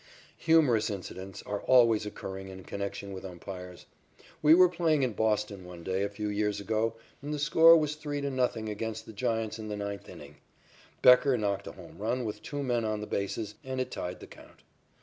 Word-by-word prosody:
Humorous 150 -10 +3
incidents 95 -1 -7
are 105 -1 -4
always 115 -4 +4
occurring 95 -2 -7
in 95 0 -9
connection 100 0 -5
with 95 - -7
umpires. 90 -1 -9 0.6
We 155 +1 +7
were 180 +1 +7
playing 165 -5 +1
in 125 -3 0
Boston 105 -3 0
one 90 -1 -10
day 95 +1 -1
a 100 - -1
few 105 +1 -4
years 105 0 -1
ago, 110 +2 -1 0.3
and 145 +1 -5
the 150 - -1
score 165 +3 +7
was 150 -2 0
3 150 -1 -4
to 140 0 -2
0 130 -1 +2 0.2
against 110 +1 -4
the 110 - -10
Giants 115 -1 -2
in 110 - -6
the 105 -1 -4
ninth 100 -2 -5
inning. - - -12 0.7
Becker 125 +1 +7
knocked 100 -1 -2
a - - -7
home 90 -1 -13
run 120 +4 -1
with 105 -1 -5
two 145 -1 -4
men 120 -3 0
on 110 -1 -1
the - - -4
bases, 105 +1 -3
and 130 -1 -4
it 130 - -2
tied 90 +1 -5
the - - -8
count. - - -16
110 Hz, 200 wpm, -29 LUFS, 100-130 Hz, 0.7 s, We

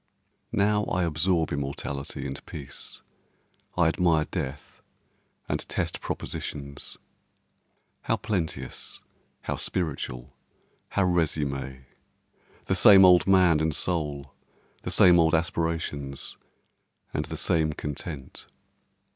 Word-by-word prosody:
Now 105 +1 +3
I 90 - 0
absorb 85 0 +1
immortality 70 -1 -4
and 70 -1 -5
peace, 70 -4 -7 0.7
I 85 -2 +5
admire 80 -2 +3
death 75 -5 -6 0.7
and - - -1
test - - -2
propositions. 70 -1 -5 1.1
How - - +1
plenteous! 95 -7 -4 0.4
how - - -3
spiritual! 70 -7 -3 0.6
how 100 - +1
resume! 70 -7 -1 0.8
The - - +1
same 95 -2 +8
old 90 -2 +6
man 90 -5 +5
and 80 -1 0
soul—the 75 -6 -5
same 90 -1 +6
old 80 -1 +4
aspirations, 80 -4 -2 0.7
and - - -1
the - - -6
same 80 -2 +1
content. 75 -1 -6
80 Hz, 95 wpm, -27 LUFS, 70-90 Hz, 1.1 s, same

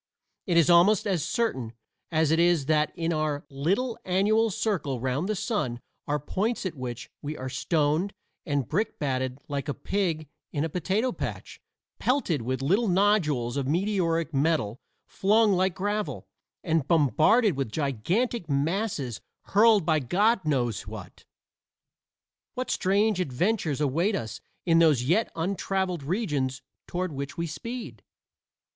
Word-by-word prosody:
It 175 -2 +2
is 165 - +5
almost 185 +5 +5
as 185 -7 0
certain 155 - -1 0.4
as 160 -2 +2
it 160 - +3
is 170 -4 +3
that 150 +1 +2
in 165 0 -1
our 155 -2 -1
little 195 - -1
annual 210 +5 +2
circle 190 - -1
round 130 - -1
the 215 - +1
sun 165 - -2 0.3
are 150 +1 0
points 205 - -2
at 185 - -2
which 125 -4 -6
we 150 +2 -5
are 130 0 -5
stoned 155 +6 0 0.3
and 145 -7 -1
brick 205 +7 -1
batted 130 -3 -2
like 145 0 -3
a 145 - -2
pig 170 -6 -1 0.2
in 145 - -1
a 165 - -1
potato 195 +9 0
patch - - -6 0.4
pelted 245 - +1
with 130 +3 -2
little 200 - +2
nodules 175 - +2
of 135 -2 -1
meteoric 165 -2 0
metal 140 -6 +1 0.3
flung 210 +1 +3
like 185 -1 +1
gravel, 205 +2 -2 0.4
and 160 -4 0
bombarded 165 - +4
with 135 -5 -2
gigantic 160 - -1
masses 145 - -1 0.3
hurled 215 -3 +5
by 155 -1 +3
God 195 - +2
knows 120 -9 0
what? 105 -4 -10 1.3
What 255 0 -2
strange 200 +1 +2
adventures 170 - 0
await 165 +9 +1
us 110 -2 -5 0.2
in 165 -2 +4
those 155 -7 +4
yet 175 - +1
untraveled 185 0 -1
regions 145 - -2 0.2
toward 180 0 -2
which 140 0 -6
we 170 - -1
speed? 165 - -6
165 Hz, 140 wpm, -27 LUFS, 140-200 Hz, 1.3 s, is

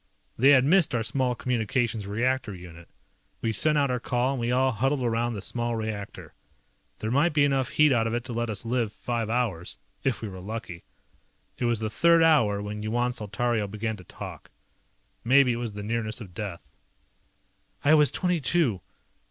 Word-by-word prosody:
They 135 +4 +4
had 130 -2 +6
missed 170 -2 +3
our 115 - 0
small 125 +1 0
communications 120 -3 -1
reactor 120 0 -1
unit. 85 -1 -12 0.5
We 115 -1 -1
sent 150 +8 +3
out 140 -3 +2
our 125 - -1
call, 125 +2 0
and 135 - -3
we 120 +1 -1
all 130 +1 +2
huddled 130 +4 0
around 120 0 0
the 100 - -5
small 120 -1 -2
reactor. 110 -3 -6 0.6
There 110 - -3
might 150 +6 +2
be 145 -1 +3
enough 135 -2 +1
heat 150 -1 +4
out 115 -2 +2
of 115 - -2
it 120 - -2
to 120 - -6
let 120 0 -2
us 110 +1 -3
live 115 -2 0
five 115 0 -3
hours. 110 -8 -2 0.3
If 130 -4 -1
we - - -2
were 95 -2 -8
lucky. 95 -3 -7 0.7
It - - 0
was 120 -2 +1
the 110 -1 -2
third 170 +7 +4
hour 115 -11 +3
when 105 +1 -5
Yuan 120 +3 0
Saltario 110 0 -1
began 110 +2 -3
to 95 - -12
talk. - - -10 0.7
Maybe 130 +1 +5
it - - -3
was 120 -3 -4
the 105 0 -6
nearness 110 0 -2
of 100 -7 -10
death. 95 -2 -6 1.2
"I 150 - +6
was 150 -3 +6
twenty 180 +2 0
two. 135 - +1
120 Hz, 190 wpm, -26 LUFS, 110-130 Hz, 1.2 s, had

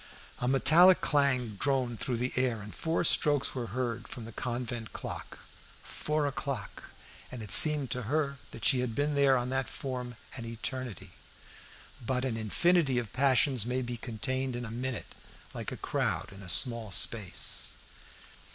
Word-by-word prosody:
A 125 - -2
metallic 160 +8 +6
clang 140 -5 +1
droned 130 -4 -1
through 125 -3 -2
the 125 +2 -2
air, 125 -3 0
and 105 0 -10
four 165 +1 -1
strokes 145 -3 +3
were 125 -3 -4
heard 120 +1 -4
from 120 - -9
the 115 - -9
convent 120 -1 -5
clock. - - -7 0.5
Four 150 0 -2
o'clock! 135 -6 -5 0.5
And 125 -3 -7
it 105 - -7
seemed 150 -4 +8
to 125 -1 -1
her 140 +3 -2
that - - -7
she 130 - +4
had 125 -3 -3
been 145 +1 0
there 140 -2 +3
on 125 0 -3
that 135 0 -1
form 125 -3 -6 0.2
an 120 - -6
eternity. 115 0 -5 0.9
But 125 +2 -2
an 125 -4 -2
infinity 135 - +1
of 115 -5 -4
passions 130 -2 +3
may 125 +2 -2
be 120 0 -5
contained 130 +2 -3
in 120 0 -5
a 110 - -8
minute, 125 0 -5 0.4
like - - -5
a - - -6
crowd - - -3
in 100 - -12
a 95 - -7
small 115 - +4
space. 100 -1 0
125 Hz, 165 wpm, -29 LUFS, 115-140 Hz, 0.9 s, seemed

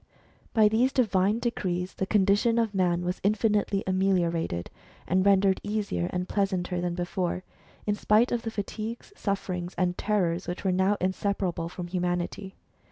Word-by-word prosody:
By 215 -2 +6
these 235 +5 +3
divine 205 -5 +2
decrees 185 -7 -2
the 190 - -3
condition 205 +3 +3
of 225 -3 +1
man 175 -2 +1
w^as 180 +1 -2
infinitely 205 -1 +1
ameliorated, 175 - 0 0.3
and 185 +1 +2
rendered 195 -1 +4
easier 205 - -2
and 180 0 -2
pleasanter 185 -3 -1
than 175 -1 -2
before; 180 0 -2 0.4
in 210 - +1
spite 215 +3 +3
of 240 - 0
the 225 - -3
fatigues, 220 - -5
sufferings, 185 - -3
and 180 -1 +1
terrors 185 -4 0
which 180 +2 -4
were 190 - +3
now 190 +3 +2
inseparable 185 -2 -1
from 180 0 -6
humanity. 180 +2 -2
190 Hz, 150 wpm, -27 LUFS, 180-210 Hz, 0.4 s, By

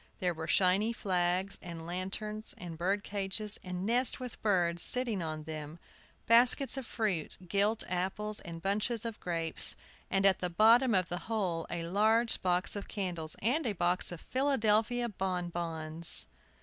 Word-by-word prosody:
There 180 -1 -1
were 160 0 -6
shining 195 +6 +2
flags 185 0 -1
and 165 -2 -8
lanterns, 200 +5 -4
and 170 -2 -7
birdcages, 200 +3 -2
and 180 0 -5
nests 245 +5 +2
with 250 -2 -8
birds 175 -5 +1
sitting 240 -6 +2
on 155 -1 -5
them, 155 0 -7 0.5
baskets 245 +4 +5
of 265 -3 -5
fruit, 200 -9 -2
gilt 205 +4 +1
apples 190 +4 -3
and 165 -2 -9
bunches 215 +4 -1
of 230 -2 -5
grapes, 165 -2 +1 0.3
and, 195 +1 +1
at 190 -2 +5
the 180 - -2
bottom 225 +6 +5
of 185 -2 +1
the 175 - -3
whole, 185 -7 -1
a 170 -1 -4
large 220 +6 +2
box 180 +2 0
of 205 - -6
candles 175 -6 -4
and 260 +6 +1
a 215 - 0
box 175 0 0
of 175 - -8
Philadelphia 245 -3 +1
bonbons! 170 -5 +1
190 Hz, 150 wpm, -31 LUFS, 175-220 Hz, 0.5 s, baskets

